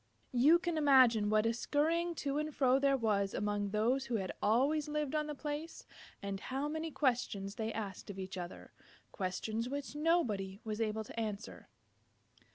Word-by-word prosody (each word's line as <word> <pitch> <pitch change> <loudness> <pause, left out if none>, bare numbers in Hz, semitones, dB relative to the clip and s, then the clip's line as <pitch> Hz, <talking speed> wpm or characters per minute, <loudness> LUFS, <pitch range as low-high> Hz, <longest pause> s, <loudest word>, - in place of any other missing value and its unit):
You 280 +7 +6
can 345 -2 -2
imagine 255 -7 +5
what 215 0 +3
a 230 - +2
scurrying 330 +7 0
to 280 +1 0
and 305 0 -2
fro 260 -1 +4
there 275 0 +3
was 205 -4 +1
among 205 0 -1
those 235 +6 +1
who 240 - -1
had 190 -4 -2
always 285 +8 +2
lived 300 -2 -2
on 305 -1 0
the 300 - -4
place, 300 +3 -5 0.4
and 200 -1 -3
how 270 +6 -3
many 315 +2 -3
questions 235 -9 0
they 220 +1 -3
asked 205 -3 -5
of 200 - -6
each 190 0 -5
other, 175 -1 -7 0.4
questions 215 +5 -2
which 280 0 -4
nobody 225 - +1
was 215 0 -3
able 220 0 -1
to 225 - -7
answer. 215 -1 -5
240 Hz, 170 wpm, -34 LUFS, 210-295 Hz, 0.4 s, You